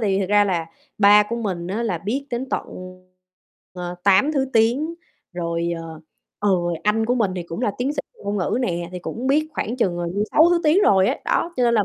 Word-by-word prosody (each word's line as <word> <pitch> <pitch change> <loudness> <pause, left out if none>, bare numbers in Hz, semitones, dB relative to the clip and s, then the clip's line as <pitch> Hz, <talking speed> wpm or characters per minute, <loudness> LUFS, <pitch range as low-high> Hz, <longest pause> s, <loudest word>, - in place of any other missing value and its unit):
vì 195 - +1
thật 190 - -1
ra 205 0 +4
là 175 -5 -1 0.3
ba 205 0 +7
của 220 +3 -4
mình 190 -7 -3
á, 205 +6 -2
là 205 -7 -1
biết 250 +11 -3
đến 245 +2 -3
tận, - - -2 1.1
ờ, 180 -1 -6
8 200 +10 +4
thứ 275 -3 +1
tiếng. 245 +9 +2 0.4
Rồi, 170 -1 -2
ờ, 160 -1 -9 0.4
ừ, 205 - +1 0.3
anh 220 +1 +1
của 245 - +2
mình 220 -6 +1
thì 180 - -3
cũng 170 +4 -7
là 245 - +1
tiến 260 +4 0
sĩ 295 - -12 0.2
về - - -18
ngôn 200 +1 -2
ngữ 195 +5 0
nè, 175 -7 -2
thì 180 - -5
cũng 235 +7 -5
biết 300 +3 +2
khoảng 240 -4 -3
chừng, 180 -8 0
ờ, 175 - -2
như 205 +2 0
6 320 +3 +6
thứ 350 -1 +3
tiếng 320 +7 +4
rồi 190 - +4
ấy. - - -2
Đó, 340 - 0
cho 250 - +1
nên 235 -1 +3
là 210 -3 +3
210 Hz, 240 wpm, -22 LUFS, 180-250 Hz, 1.1 s, ba